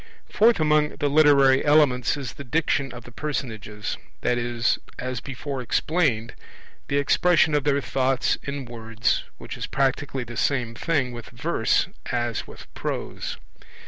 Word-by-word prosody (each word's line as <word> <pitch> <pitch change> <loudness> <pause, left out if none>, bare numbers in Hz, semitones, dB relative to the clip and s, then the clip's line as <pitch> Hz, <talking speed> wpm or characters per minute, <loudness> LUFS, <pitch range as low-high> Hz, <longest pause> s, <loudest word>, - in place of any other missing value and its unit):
Fourth 225 0 +4
among 150 -1 +2
the 145 - 0
literary 140 -3 +5
elements 145 -4 +3
is 135 -4 -5
the 140 - -9
Diction 140 0 0
of 120 -1 -9
the 120 - -12
personages, 110 -7 -4 0.2
i.e. 120 -1 -1 0.4
as 130 -1 -3
before 135 +1 -5
explained, 125 -3 0 0.5
the 140 - 0
expression 160 +2 +3
of 145 -1 +1
their 140 -1 +2
thoughts 130 -1 +1
in 140 -1 -5
words, 115 -1 -1
which - - -8
is - - -5
practically 135 -1 0
the 120 0 -8
same 125 -5 0
thing 135 -1 0
with 120 -1 -9
verse - - +1 0.2
as 120 -2 -2
with - - -11
prose. - - -4
135 Hz, 145 wpm, -24 LUFS, 120-145 Hz, 0.5 s, literary